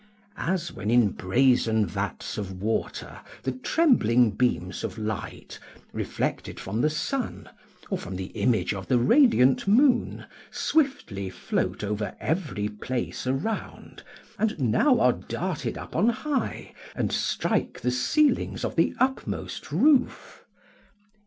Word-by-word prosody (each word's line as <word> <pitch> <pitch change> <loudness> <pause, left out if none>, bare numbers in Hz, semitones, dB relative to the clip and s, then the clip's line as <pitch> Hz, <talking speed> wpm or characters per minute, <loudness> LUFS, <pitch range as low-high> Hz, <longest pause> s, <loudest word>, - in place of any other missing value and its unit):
["As 175 -1 -1
when 100 +3 -4
in 120 -2 +5
brazen 110 +2 +2
vats - - -4
of 95 -2 -6
water 110 +3 -3 0.2
the 130 - 0
trembling 125 - +3
beams 100 -6 -1
of - - -4
light, 110 -1 -5 0.3
reflected - - -3
from 105 +5 -2
the 150 - +3
sun, 250 - -3 0.4
or - - 0
from 95 - -7
the 95 +1 -5
image 105 -3 +1
of 95 -2 -6
the 125 - +3
radiant 135 - +4
moon, 250 +5 +3 0.2
swiftly 265 - 0
float 95 - -2
over 105 -1 -3
every 150 - -1
place 120 +5 -4
around, 140 +13 -3 0.4
and 215 -3 0
now 140 - +3
are - - +4
darted - - -4
up - - -9
on 225 - +4
high, 260 +2 -3 0.2
and - - -1
strike - - -1
the 125 - +1
ceilings 245 - +1
of - - -4
the - - +2
upmost 265 +1 -2
roof." 285 -4 +2
125 Hz, 125 wpm, -26 LUFS, -, 0.4 s, in